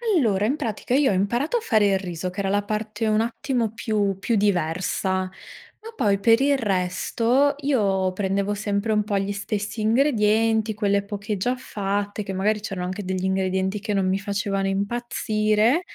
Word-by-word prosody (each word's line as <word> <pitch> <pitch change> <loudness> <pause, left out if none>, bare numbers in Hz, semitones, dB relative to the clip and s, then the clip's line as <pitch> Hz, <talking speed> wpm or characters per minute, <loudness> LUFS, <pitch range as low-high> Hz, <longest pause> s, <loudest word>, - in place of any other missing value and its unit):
Allora, 210 - +2
in 270 +7 0
pratica 245 -3 -3
io 275 0 +4
ho - - +1
imparato 240 - 0
a - - 0
fare 220 - +2
il 195 -1 +2
riso, 180 -1 -4
che 180 +2 -8
era 195 - -1
la 205 +1 +2
parte 215 +1 -3
un 215 0 +2
attimo 230 -1 -1
più 210 -4 0
più 210 +4 0
diversa, 190 -1 0
ma 190 - -11
poi 200 - +2
per 225 +3 +5
il 280 +1 +3
resto 230 +6 +1
io 195 -9 +1
prendevo 200 +1 -1
sempre 205 +1 -1
un 210 -1 +2
po' 205 -1 -1
gli 195 +1 -1
stessi 205 +1 -3
ingredienti, 220 -2 +2
quelle 200 -1 +1
poké 205 0 -4
già 250 +7 0
fatte, 205 -3 -3
che 195 -1 -5
magari 210 +3 +1
c'erano 195 -4 -4
anche 185 +3 -4
degli 185 0 -3
ingredienti 190 +1 0
che 210 0 -3
non 195 -1 +1
mi 190 +1 +1
facevano 200 -1 -1
impazzire 215 - +1
205 Hz, 175 wpm, -24 LUFS, 195-225 Hz, -, per